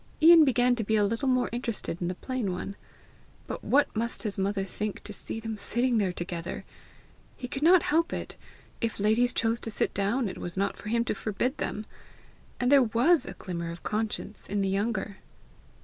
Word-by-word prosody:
Ian 325 Hz, 0 st, +9 dB
began 250 Hz, -2 st, +3 dB
to 225 Hz, -, 0 dB
be 220 Hz, +2 st, +1 dB
a 210 Hz, -1 st, +4 dB
little 230 Hz, +6 st, -1 dB
more 255 Hz, -1 st, +3 dB
interested 230 Hz, -7 st, -3 dB
in 175 Hz, -, 0 dB
the 180 Hz, -, -2 dB
plain 250 Hz, -2 st, -3 dB
one. 185 Hz, +2 st, -5 dB, 0.7 s
But -, -, -6 dB
what 285 Hz, -2 st, +2 dB
must 230 Hz, +1 st, -2 dB
his 210 Hz, -3 st, -2 dB
mother 195 Hz, 0 st, 0 dB
think 210 Hz, +1 st, -4 dB
to 210 Hz, -, -5 dB
see 220 Hz, -, -4 dB
them 225 Hz, -1 st, -5 dB
sitting 240 Hz, +3 st, +1 dB
there 195 Hz, -3 st, +1 dB
together! 175 Hz, -1 st, -5 dB, 0.7 s
He 250 Hz, -, -5 dB
could 270 Hz, -, -4 dB
not 345 Hz, +2 st, +6 dB
help 330 Hz, +3 st, +2 dB
it! -, -, -5 dB, 0.5 s
if 230 Hz, -3 st, -2 dB
ladies 220 Hz, +4 st, +3 dB
chose 230 Hz, 0 st, 0 dB
to 225 Hz, -, -5 dB
sit 210 Hz, -, -1 dB
down, 210 Hz, +5 st, 0 dB
it 190 Hz, -, -6 dB
was 175 Hz, +1 st, -5 dB
not 200 Hz, +1 st, 0 dB
for 210 Hz, -, -8 dB
him 235 Hz, +1 st, +1 dB
to -, -, 0 dB
forbid 220 Hz, +6 st, -2 dB
them! 215 Hz, -, -3 dB, 0.7 s
And 245 Hz, +1 st, +2 dB
there 280 Hz, -1 st, +8 dB
WAS 250 Hz, +8 st, +3 dB
a -, -, -5 dB
glimmer 170 Hz, -3 st, -5 dB
of 170 Hz, +1 st, -8 dB
conscience 215 Hz, 0 st, -3 dB
in 205 Hz, 0 st, 0 dB
the 195 Hz, -, +1 dB
younger! 200 Hz, 0 st, -1 dB
220 Hz, 200 wpm, -28 LUFS, 200-250 Hz, 0.7 s, Ian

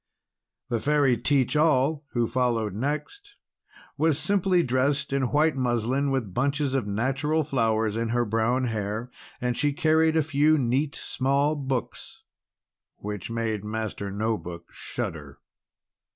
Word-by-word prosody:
The 120 Hz, -2 st, 0 dB
Fairy 140 Hz, -1 st, +3 dB
Teach 130 Hz, +3 st, +1 dB
All, 150 Hz, -1 st, +3 dB
who 120 Hz, -1 st, +2 dB
followed 115 Hz, -4 st, 0 dB
next, 150 Hz, -, -4 dB, 0.6 s
was 155 Hz, -2 st, +3 dB
simply 180 Hz, +2 st, +2 dB
dressed 135 Hz, +2 st, 0 dB
in 135 Hz, -3 st, +1 dB
white 155 Hz, +1 st, +2 dB
muslin, 130 Hz, +2 st, 0 dB
with 125 Hz, -9 st, -2 dB
bunches 140 Hz, +3 st, 0 dB
of 130 Hz, -6 st, 0 dB
natural 135 Hz, +9 st, 0 dB
flowers 110 Hz, -5 st, 0 dB
in 115 Hz, 0 st, -1 dB
her 120 Hz, +1 st, +1 dB
brown 115 Hz, +4 st, +1 dB
hair; 110 Hz, +1 st, -3 dB, 0.3 s
and 125 Hz, -1 st, -1 dB
she 145 Hz, +2 st, +1 dB
carried 160 Hz, 0 st, +3 dB
a 160 Hz, -, +3 dB
few, 150 Hz, +1 st, +3 dB
neat, 135 Hz, +3 st, 0 dB
small 140 Hz, +3 st, 0 dB
books, 135 Hz, -4 st, -4 dB, 0.7 s
which 105 Hz, -2 st, -6 dB
made 115 Hz, -3 st, -2 dB
Master 105 Hz, -2 st, -4 dB
No 110 Hz, +2 st, -1 dB
Book 85 Hz, -1 st, -9 dB
shudder. -, -, -6 dB
130 Hz, 135 wpm, -26 LUFS, 115-145 Hz, 0.7 s, Fairy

